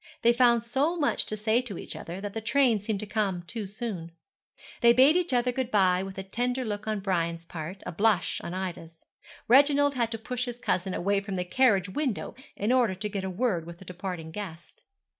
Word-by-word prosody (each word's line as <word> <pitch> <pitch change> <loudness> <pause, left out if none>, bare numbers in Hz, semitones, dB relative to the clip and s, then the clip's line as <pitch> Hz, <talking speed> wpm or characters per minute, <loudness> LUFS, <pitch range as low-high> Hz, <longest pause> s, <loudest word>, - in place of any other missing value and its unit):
They 235 +1 +6
found 235 -2 +4
so 280 +8 0
much 295 -3 +1
to 215 - -3
say 220 +3 +2
to 220 -8 -7
each - - -7
other, 175 +3 -7
that 205 -1 -5
the 225 - -4
train 235 0 +3
seemed 205 0 -3
to - - -4
come 200 -4 -1
too 210 +3 -5
soon. 200 -5 -5 0.7
They 235 -1 +7
bade 265 +6 +6
each 355 -3 +1
other 250 0 +2
good 255 -1 -2
bye 185 -5 +3
with 195 0 -7
a 195 - -4
tender 245 +6 -2
look 210 -1 -4
on 215 -2 -1
Brian's 170 -3 -1
part, 170 +3 -7
a - - -4
blush 205 +2 +1
on 175 - -5
Ida's. 170 -3 -6 0.4
Reginald 285 +3 +5
had 235 -3 0
to 225 - -4
push 250 +3 -3
his 240 -1 -6
cousin 190 -6 -1
away 200 +2 +1
from 200 -1 -5
the 180 -1 -2
carriage 200 -2 +3
window, 260 0 -2 0.2
in 210 +4 0
order 245 -7 +3
to 210 +3 -4
get 195 -1 -3
a 190 - -2
word 185 -4 -1
with 170 0 -9
the 190 - -14
departing 180 -3 -6
guest. 175 -4 -8
210 Hz, 215 wpm, -28 LUFS, 185-245 Hz, 0.7 s, They